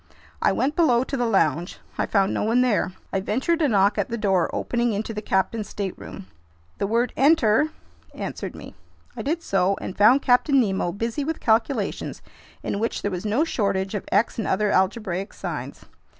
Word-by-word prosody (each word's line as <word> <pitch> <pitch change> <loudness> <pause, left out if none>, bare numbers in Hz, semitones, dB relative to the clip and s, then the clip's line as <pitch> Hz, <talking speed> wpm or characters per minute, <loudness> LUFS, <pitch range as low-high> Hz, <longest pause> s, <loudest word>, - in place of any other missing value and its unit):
I - - +3
went 285 +4 0
below 250 -8 +3
to 275 - -4
the 245 -2 0
lounge. 170 -5 +1 0.2
I - - -1
found 195 -2 +2
no - - -1
one 230 +4 +2
there. 225 -6 +1 0.2
I 195 - +1
ventured 265 - 0
a 300 - +4
knock 200 -3 +3
at - - -1
the 235 - -3
door 190 -5 +1
opening 240 -1 -1
into 220 +2 -3
the 210 - -4
captain's 205 +2 -1
stateroom. 195 -1 -6 0.5
The 200 - 0
word 235 +4 0
"Enter!" 280 -1 +4 0.5
answered - - -5
me. - - -10 0.4
I - - -5
did 325 +4 -2
so 195 0 +1
and - - -6
found 245 +7 +5
Captain 265 +3 +4
Nemo 195 -6 0
busy 230 - -3
with 320 +2 -3
calculations 225 -1 0 0.4
in 200 - -2
which 230 +2 -2
there 205 - -1
was 185 +3 -4
no 230 +9 +2
shortage 200 -10 -1
of 205 - -5
X 215 +3 +1
and 220 - -2
other 205 +2 +1
algebraic 190 0 0
signs. - - -6
215 Hz, 185 wpm, -24 LUFS, 195-250 Hz, 0.5 s, found